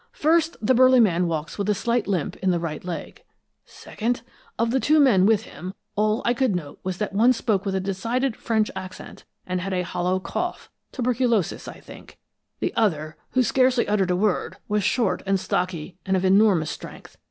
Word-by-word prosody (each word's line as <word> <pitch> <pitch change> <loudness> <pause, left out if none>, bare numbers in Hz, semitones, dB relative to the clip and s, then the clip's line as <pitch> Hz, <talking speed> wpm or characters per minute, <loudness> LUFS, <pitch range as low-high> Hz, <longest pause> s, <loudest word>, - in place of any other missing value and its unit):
First, 325 +2 +2
the 245 +4 +2
burly 255 +1 +6
man 180 -6 +3
walks 160 +3 -4
with 200 +1 -1
a 210 - +3
slight 235 +3 0
limp 185 -7 -1
in 190 - 0
the 175 - +2
right 165 -2 -5
leg. 180 -1 -7 0.4
Second, 240 +3 -4 0.3
of 230 0 +1
the 265 - +2
two 305 +4 +3
men 210 -10 +5
with 220 -1 +3
him, 185 -1 -9 0.2
all 215 +1 +1
I 240 - +3
could 245 -5 +1
note 150 -5 -6
was 185 -1 -4
that 210 -1 -3
one 235 +5 +5
spoke 215 -4 -1
with 190 - -1
a - - +1
decided 225 +7 -1
French 220 -2 0
accent 185 0 -9 0.2
and 185 0 -2
had 190 +1 -3
a 180 -1 0
hollow 180 +1 -1
cough, 355 - -4 0.2
tuberculous, 245 - 0
I - - -9
think; - - -14 0.4
the - - -1
other, 155 -8 0 0.2
who 255 - +3
scarcely 255 +1 +2
uttered 200 -3 +1
a 180 - +2
word, 200 +1 0
was 210 -1 0
short 205 +1 +1
and 195 0 +2
stocky, 180 -2 -3
and 190 0 +1
of 185 - -1
enormous 190 -4 +4
strength. - - -10
205 Hz, 195 wpm, -24 LUFS, 185-240 Hz, 0.4 s, burly